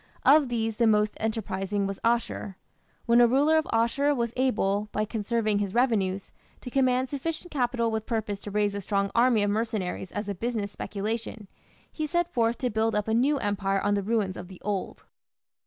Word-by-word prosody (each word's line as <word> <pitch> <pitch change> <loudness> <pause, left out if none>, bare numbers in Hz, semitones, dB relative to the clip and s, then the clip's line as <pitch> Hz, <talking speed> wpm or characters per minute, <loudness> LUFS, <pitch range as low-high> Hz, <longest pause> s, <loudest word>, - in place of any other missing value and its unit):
Of 285 -1 +6
these 225 -2 -1
the 235 - +3
most 210 -1 +2
enterprising 200 -2 -2
was 195 0 -4
Asshur. 230 -4 0 0.5
When 235 +1 +5
a 240 - +7
ruler 285 +6 +3
of 315 - 0
Asshur 250 +6 +2
was 235 -2 -1
able, 210 -5 +1
by 215 - 0
conserving 215 -1 0
his 200 0 -3
revenues, 200 -6 +1 0.3
to 250 - -8
command 255 -1 +2
sufficient 320 +5 -4
capital 240 -4 0
with 220 -1 -3
purpose 215 -3 -2
to - - -7
raise 205 0 +1
a 200 - -4
strong 200 +1 -1
army 235 -3 +4
of 205 - +1
mercenaries 210 -4 -2
as 205 0 -4
a 200 - -2
business 215 0 -3
speculation, 215 +1 -4 0.4
he 310 -1 -3
set 345 +2 -1
forth 230 0 +1
to 250 -2 -1
build 220 +1 +1
up 210 0 0
a 220 - 0
new 270 +6 +3
empire 200 -4 0
on 205 +1 +1
the 200 - +1
ruins 205 -2 0
of 180 - -7
the 185 -1 -12
old. 205 -2 -3
220 Hz, 190 wpm, -27 LUFS, 205-245 Hz, 0.5 s, a